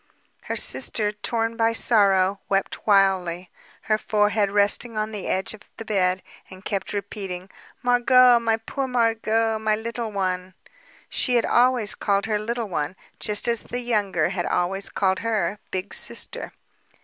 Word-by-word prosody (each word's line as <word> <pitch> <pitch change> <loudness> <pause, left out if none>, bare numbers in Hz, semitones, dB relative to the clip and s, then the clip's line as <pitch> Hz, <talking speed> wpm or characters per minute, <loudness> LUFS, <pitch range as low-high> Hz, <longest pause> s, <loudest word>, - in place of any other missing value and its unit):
Her - - -3
sister, 210 -2 +3
torn 225 +2 -2
by 230 0 +1
sorrow, 200 -4 +4
wept 195 +2 -2
wildly, 185 -3 +2 0.3
her 215 0 0
forehead 210 -1 +1
resting 205 +3 +1
on 215 0 -2
the 205 -3 -6
edge 190 +3 -1
of 215 - -15
the 225 - -8
bed, 185 -3 0 0.3
and 185 +1 -13
kept 195 -3 -3
repeating: 195 -2 -6 0.3
"Margot, 245 0 +5
my 225 -1 +1
poor 265 +4 -4
Margot, 225 -2 +1
my 215 0 +1
little 230 +1 -5
one!" 185 -2 -3 0.5
She 250 - 0
had 235 - +3
always 245 -3 +2
called 200 -1 0
her, 215 -1 -1
"Little 230 +1 -3
One," 165 -2 -3 0.2
just 210 +3 -1
as 235 -1 +1
the 245 - -5
younger 205 -9 0
had 180 -2 -3
always 195 +3 -1
called 190 -1 0
her 210 -3 -1
"Big 185 +2 -4
Sister." - - -3
210 Hz, 150 wpm, -23 LUFS, 195-230 Hz, 0.5 s, Margot